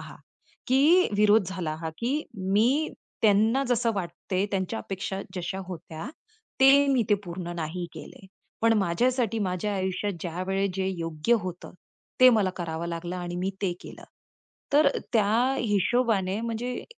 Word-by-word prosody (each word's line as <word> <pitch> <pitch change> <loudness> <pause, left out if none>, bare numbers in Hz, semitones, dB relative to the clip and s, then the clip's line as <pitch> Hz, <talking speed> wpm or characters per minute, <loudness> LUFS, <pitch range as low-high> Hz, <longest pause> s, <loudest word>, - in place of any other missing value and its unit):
हा - - -10 0.5
की 300 +8 +5
विरोध 210 0 +5
झाला 175 -5 -3
हा, 160 - -3
की 270 +6 -1 0.3
मी 255 +10 +3 0.3
त्यांना 220 +5 +4
जसं 240 -1 +2
वाटतं, 185 +1 -2
त्यांच्या 195 +3 -1
अपेक्षा 195 0 -4 0.2
जश्या 180 +2 -3
होत्या, 160 -1 -7 0.5
ते 280 +1 +7
मी 250 - +3 0.2
पूर्ण 175 0 -6
नाही 170 +2 -4
केलं. 190 - -11 0.4
पण 230 - +5
माझ्यासाठी 225 +5 +1
माझ्या 200 +1 -1
आयुष्यात 190 +2 -2
ज्यावेळी 190 +3 -1
जे 190 -1 -1
योग्य 165 +6 0
होतं, 180 -1 -7 0.5
ते 255 0 +9
मला 210 -5 +2
करावं 170 -1 -4
लागलं 175 +1 -4
आणि 175 -1 -5
मी 185 +2 -1
ते 185 - +1
केलं. - - -11 0.7
तर 290 0 +6 0.2
त्या 230 +5 +3
हिशोबाने 210 -2 +1
म्हणजे 235 +2 -4
195 Hz, 140 wpm, -27 LUFS, 180-235 Hz, 0.7 s, ते